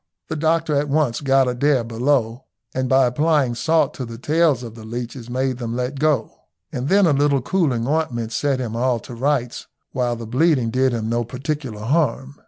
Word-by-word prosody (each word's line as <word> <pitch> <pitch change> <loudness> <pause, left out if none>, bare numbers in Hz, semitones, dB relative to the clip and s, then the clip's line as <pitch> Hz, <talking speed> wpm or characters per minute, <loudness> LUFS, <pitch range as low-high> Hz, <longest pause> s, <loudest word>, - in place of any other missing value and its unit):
The 160 - -2
doctor 160 0 +1
at 145 +1 0
once 140 -4 +1
got 135 -1 +3
Adair 125 +1 +2
below, 120 +1 0 0.3
and 130 0 -1
by 130 0 +5
applying 145 0 +2
salt 160 +6 +1
to 130 - -6
the 115 -1 -7
tails 150 0 +2
of 115 -2 -8
the 115 -1 -11
leeches 120 +2 -6
made 130 0 -1
them 115 -1 -3
let 125 +2 -3
go. 150 -6 +1 0.4
And 125 +3 -3
then 200 0 +5
a 160 - +4
little 140 -2 +2
cooling 135 -11 0
ointment 130 -7 -1
set 140 +1 0
him 115 -3 -4
all 125 0 +1
to 125 - -10
rights, 125 0 -1 0.2
while 125 -2 -1
the 115 0 -7
bleeding 130 0 +2
did 130 +1 +2
him 115 -2 -2
no 120 +1 0
particular 130 -2 -5
harm. 140 +1 0
130 Hz, 190 wpm, -21 LUFS, 120-145 Hz, 0.4 s, by